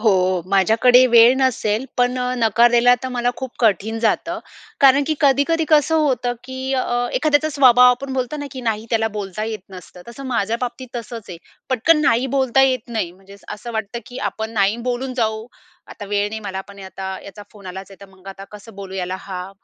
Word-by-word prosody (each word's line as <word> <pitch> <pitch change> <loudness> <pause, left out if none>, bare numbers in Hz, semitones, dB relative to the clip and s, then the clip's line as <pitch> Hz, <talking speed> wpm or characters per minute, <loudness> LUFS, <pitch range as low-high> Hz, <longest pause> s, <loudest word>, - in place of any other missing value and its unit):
हो, 185 -4 +2
माझ्याकडे 225 +6 +5
वेळ 235 +2 +7
नसेल 245 -3 0
पण 245 +1 +1
अ, 250 0 -1
नकार 230 +1 +4
दिला 240 +1 +5
तर 260 - -3
मला 245 -1 -1
खूप 260 -1 -6
कठीण 220 0 +1
जातं. 330 +10 0 0.4
कारण 275 +1 +5
की 310 - 0
कधी, 280 -1 +4
कधी 330 -1 +1
कसं 310 +1 +3
होतं 255 -5 0
की 260 0 -8 0.2
अ, 255 - +1 0.3
एखाद्याचा 310 0 +2
स्वभाव 250 -3 +6
आपण 265 +2 -3
बोलतो 260 +2 -2
ना 290 -1 -5
की 260 -1 -7
नाही 225 -2 -2
त्याला 225 -1 +1
बोलता 205 +1 -4
येत 220 -1 -4
नसतं 180 -1 -12
तसं 255 +4 -10
माझ्या 230 -3 -1
बाबतीत 250 +1 -5
तसंच 230 -1 -7
आहे. 170 - -8 0.3
पटकन 300 +6 +3
नाही 260 -3 +2
बोलता 265 0 +3
येत 255 -3 +1
नाही 220 -7 -2
म्हणजे 195 +2 -16
असं 220 +3 -7
वाटतं 220 +1 -4
की 250 - -9
आपण 220 0 -6
नाही 205 0 +1
बोलून 255 +1 -3
जाऊ. 220 -2 -2 0.4
आता 205 - -9
वेळ 205 0 0
नाही 220 +1 -6
मला 190 -2 -5
पण 200 0 -13
आता 190 0 -6
याचा 200 +1 -11
फोन 200 -3 -14
आलाच 190 +2 -8
आहे 195 - -15
तर 200 - -11
मग 190 0 -22
आता 195 0 -9
कसं 210 +1 -12
बोलू 195 -1 -9
याला 185 0 -3
हां, 185 -1 -7
230 Hz, 205 wpm, -20 LUFS, 200-255 Hz, 0.4 s, वेळ